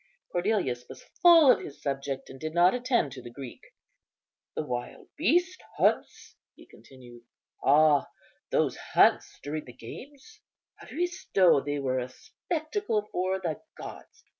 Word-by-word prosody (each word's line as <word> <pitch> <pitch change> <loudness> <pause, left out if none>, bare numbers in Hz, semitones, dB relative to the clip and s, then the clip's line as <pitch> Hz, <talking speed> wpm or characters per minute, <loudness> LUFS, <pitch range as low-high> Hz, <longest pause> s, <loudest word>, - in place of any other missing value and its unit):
Cornelius 175 - 0
was - - -11 0.2
full 330 -6 +8
of - - +2
his 145 - -10
subject, 135 -1 -4
and 135 - -11
did 155 +2 -5
not 175 +1 +5
attend 245 - 0
to 130 - -9
the 120 - -10
Greek. 125 0 -10 0.9
"The - - -2
wild 125 -2 -6
beasts 355 +3 +1 0.2
hunts," - - 0 0.2
he - - -16
continued, 120 -3 -16 0.4
"ah, 145 0 +4 0.4
those - - +1
hunts - - +2
during 150 +1 -4
the 125 - -12
games, 285 - -12 0.4
Aristo! 200 - +1
they 145 0 -2
were 130 -2 -1
a 125 0 -5
spectacle 310 - -3
for 185 +1 -1
the 160 -4 -3 0.2
gods. - - -11
155 Hz, 140 wpm, -28 LUFS, -, 0.9 s, full